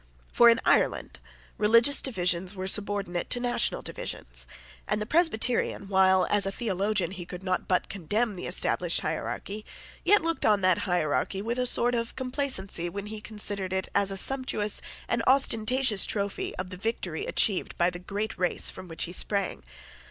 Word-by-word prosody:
For 235 - +6
in 230 +1 +4
Ireland - - +1 0.4
religious 230 +6 +5
divisions 180 -5 -1
were 185 0 -5
subordinate 200 -3 +1
to 245 - +2
national 245 0 0
divisions; - - -5 0.4
and 210 - 0
the 210 - -3
Presbyterian, 245 - 0
while, 190 -1 +4
as 205 -1 +3
a - - -1
theologian, 200 -3 -1
he 185 -2 -7
could 180 +2 -9
not 185 -1 -2
but 185 - +1
condemn 205 +4 -2
the 180 - -6
established - - +1
hierarchy, 210 +2 -4 0.4
yet 415 -4 +4
looked 330 0 -2
on 210 -2 +3
that 185 -1 +3
hierarchy 175 +2 0
with 235 +3 -3
a 250 - +1
sort 245 0 +1
of 230 -1 -2
complacency 250 - -2
when 200 +3 -6
he 215 - -7
considered 205 -3 -4
it 190 0 -2
as 200 -1 +2
a 195 - -1
sumptuous 255 -3 +2 0.3
and 235 - 0
ostentatious 255 -3 +4
trophy 200 -1 -3
of 185 0 -6
the 185 - -6
victory 185 -5 -4
achieved 200 -4 0
by 175 +1 +2
the 175 - -8
great 205 +4 -4
race 180 -1 +1
from 185 0 -10
which 165 -1 -3
he 170 - -4
sprang. 195 - -1
205 Hz, 170 wpm, -27 LUFS, 185-230 Hz, 0.4 s, For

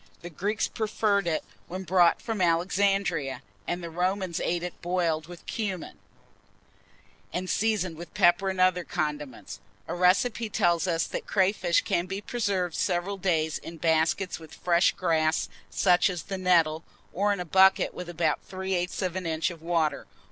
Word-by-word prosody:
The 175 - -7
Greeks 205 +7 -1
preferred 210 -3 0
it 160 -2 0 0.2
when 185 +2 -5
brought 175 -1 +3
from 225 -4 -2
Alexandria, 180 -3 +1 0.2
and 175 0 -2
the 170 - -6
Romans 185 +1 -1
ate 175 0 -1
it 180 - -6
boiled 170 -3 0
with 175 0 -12
cumin, 195 -6 -4 1.3
and 185 +1 -3
seasoned 195 -6 0
with 170 0 -9
pepper 175 +3 +4
and 190 -1 -3
other 185 -1 +3
condiments. 145 - -4 0.3
A - - -3
recipe 215 +6 +2
tells 175 -2 +2
us, 165 -2 +1
that - - -5
crayfish 185 -3 +2
can 170 +1 0
be 195 +1 -4
preserved 200 -6 -1
several 185 +3 -1
days 160 -4 0
in 165 0 -9
baskets 160 +4 +1
with 160 -1 -12
fresh 175 -1 +3
grass, 160 -2 +1 0.2
such 180 -1 +3
as 175 -5 -4
the 195 +4 -5
nettle, 165 -3 +3 0.3
or 205 +3 +1
in 200 - -1
a 180 - -3
bucket 190 +3 +4
with 180 -1 -7
about 165 -3 0
three 190 0 -4
eighths 180 +2 -1
of 180 -1 -2
an 185 -2 -3
inch 160 +2 0
of 165 -2 -11
water. 160 -4 0
180 Hz, 165 wpm, -27 LUFS, 165-190 Hz, 1.3 s, pepper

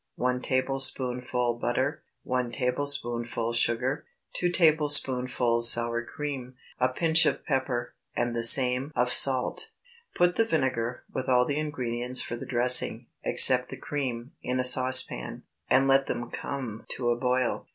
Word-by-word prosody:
1 125 0 -2
tablespoonful 125 -2 -1
butter. 130 +5 -3 0.2
1 125 -1 -3
tablespoonful 120 -3 -2
sugar. 120 +5 0 0.3
2 175 - -2
tablespoonfuls 130 -8 +3
sour 120 0 -1
cream. 130 -2 -8 0.2
A 125 0 +1
pinch 160 +4 +2
of - - -3
pepper, 130 -4 -3 0.2
and 120 -1 -3
the 115 - -2
same 125 +3 +6
of 125 0 0
salt. 135 - +2 0.5
Put 175 0 0
the 225 - +2
vinegar, 125 - -3
with 130 - -5
all 125 -1 +2
the 145 +2 -3
ingredients 125 -4 -3
for 120 - -6
the 120 - -10
dressing, 125 0 +2 0.2
except - - +5
the - - -9
cream, 130 -4 -6
in 125 0 -4
a - - 0
saucepan, 130 +1 +1 0.3
and 135 +1 +2
let 135 0 +2
them 120 0 -6
come 125 -6 -7
to 120 -1 -2
a - - 0
boil. 125 0 -2
125 Hz, 140 wpm, -25 LUFS, 120-135 Hz, 0.5 s, same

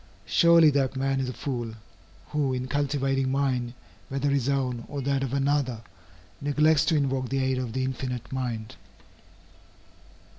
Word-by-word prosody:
Surely 170 -2 +6
that 135 -2 0
man 135 0 0
is 130 -1 -1
a - - -4
fool, 120 -5 -4 0.5
who 145 -3 0
in 125 0 -3
cultivating 135 -1 0
mind, 130 -3 0 0.3
whether 135 +1 0
his 140 -2 +1
own 130 -4 -1
or 145 - -5
that 135 0 0
of 135 -3 -2
another, 135 -4 0 0.6
neglects 150 +1 +3
to 165 - +2
invoke 135 -3 0
the 135 - -1
aid 130 -1 +1
of 125 -3 -4
the 130 +1 -1
Infinite 130 -2 -4
Mind. 125 -3 -3
135 Hz, 150 wpm, -27 LUFS, 130-140 Hz, 0.6 s, Surely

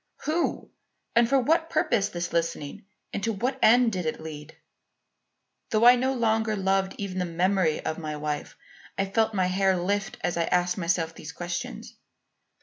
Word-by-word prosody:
who? 325 +3 -1 0.4
and 235 0 +4
for 275 0 +4
what 320 +5 +2
purpose 310 - +1
this 175 0 -4
listening; 165 -2 -2 0.3
and 200 - -3
to 225 - +1
what 250 +6 -2
end 240 +1 +5
did 180 -3 -2
it 155 - -2
lead? 155 -1 -9 1.1
"Though 220 +1 +3
I 245 +1 +9
no 260 +2 0
longer 220 -2 +1
loved 195 -1 0
even 190 -2 -4
the 180 - 0
memory 175 -1 +1
of 160 - -2
my 155 -2 -4
wife, 150 0 -4 0.4
I 195 - +1
felt 220 +2 0
my 185 -2 +2
hair 190 +1 +2
lift, 195 +3 -2
as 175 +1 -1
I 170 - +1
asked 180 +1 +1
myself 170 -2 0
these 155 - -9
questions. 175 +1 -6
190 Hz, 170 wpm, -26 LUFS, 170-225 Hz, 1.1 s, I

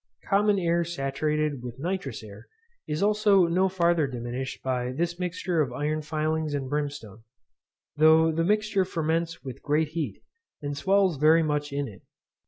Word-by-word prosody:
Common 205 0 +3
air 170 -2 +1
saturated 150 -2 -1
with 120 0 -7
nitrous 155 -6 -4
air 100 -2 -12 0.4
is 155 +4 -1
also 205 -3 +4
no 185 +3 +2
farther 170 -4 +2
diminished 125 +1 -5
by 125 -1 -1
this 170 +5 -2
mixture 180 -1 -1
of 135 -4 -1
iron 150 +4 -2
filings 155 0 -1
and 135 -2 -3
brimstone, 140 -7 -4 0.8
though 160 +1 +6
the 165 +1 0
mixture 210 +1 +2
ferments 165 -1 -2
with 130 -4 -8
great 150 +1 +1
heat, 150 - -4 0.4
and 145 0 -4
swells 190 0 +2
very 160 +3 +5
much 150 -1 -1
in 140 0 -2
it. 100 - -12
155 Hz, 155 wpm, -26 LUFS, 140-170 Hz, 0.8 s, though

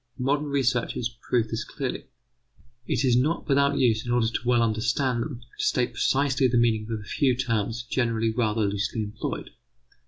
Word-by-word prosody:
Modern 145 +3 0
researches 125 -3 0
prove 120 -3 +2
this 115 - -2
clearly. - - -5 0.8
It - - +1
is 125 -2 +4
not 150 +7 +1
without 140 0 +3
use, 115 -3 +2
in 120 - -4
order 120 -2 +2
to 120 +1 -4
well 120 -1 +4
understand 120 +3 0
them, 125 -2 -5 0.2
to - - -1
state 125 -1 +1
precisely 135 -1 +2
the 120 0 +1
meaning 110 -2 +2
of 110 - -2
a - - -10
few 130 +3 +1
terms 115 -2 -1
generally 115 -2 0
rather 110 -1 0
loosely 100 +3 -1
employed. 105 +1 -5
120 Hz, 175 wpm, -26 LUFS, 115-130 Hz, 0.8 s, is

